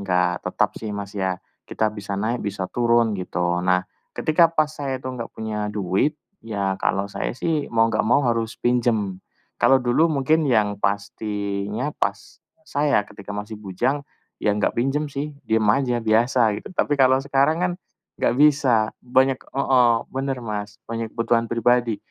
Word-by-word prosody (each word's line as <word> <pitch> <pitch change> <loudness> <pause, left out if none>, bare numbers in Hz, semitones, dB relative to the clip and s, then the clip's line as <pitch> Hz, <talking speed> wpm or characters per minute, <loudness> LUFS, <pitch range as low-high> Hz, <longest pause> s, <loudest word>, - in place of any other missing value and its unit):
enggak 90 -2 +1
tetap - - 0
sih 110 - -5
Mas 100 0 -6
ya, 95 -2 -1 0.3
kita 110 -1 0
bisa 100 -2 -5
naik 115 +5 -1
bisa 100 -2 -3
turun 120 -2 +3
gitu. 90 -1 -1
Nah, 90 0 +2 0.3
ketika 165 +2 +4
pas 155 -2 +1
saya 140 -3 -3
itu 130 0 -7
enggak 120 -2 -5
punya 105 -1 -3
duit, 100 - 0 0.2
ya 100 -4 -2
kalau 100 +1 +1
saya 110 - -3
sih 155 0 -1
mau 115 -1 +3
enggak - - +1
mau 140 +4 +3
harus 115 -1 0
pinjem. 115 -6 0 0.4
Kalau 135 - +6
dulu 125 +7 +2
mungkin 155 +1 +2
yang 105 -4 +1
pastinya 100 +4 -2
pas - - -3 0.3
saya 145 - +2
ketika 100 -1 -12
masih 105 +1 -6
bujang, 120 +9 -1 0.4
ya 105 - +3
enggak 105 - +1
pinjam 135 +5 0
sih. 145 +1 -5
diem 110 -1 +2
aja, 120 +1 +1
biasa 115 +3 +2 0.2
gitu. - - -11
Tapi 145 -3 +1
kalau 130 0 +5
sekarang 140 +3 +2
kan 180 - +1 0.5
nggak 120 - +2
bisa, 135 -7 +4
banyak 130 +1 +2
heeh, 125 -3 +3 0.2
bener 135 0 -2
Mas, 105 -1 -5
banyak 115 0 -4
kebutuhan 115 0 +1
pribadi, 120 -1 +2
115 Hz, 160 wpm, -23 LUFS, 105-135 Hz, 0.5 s, Kalau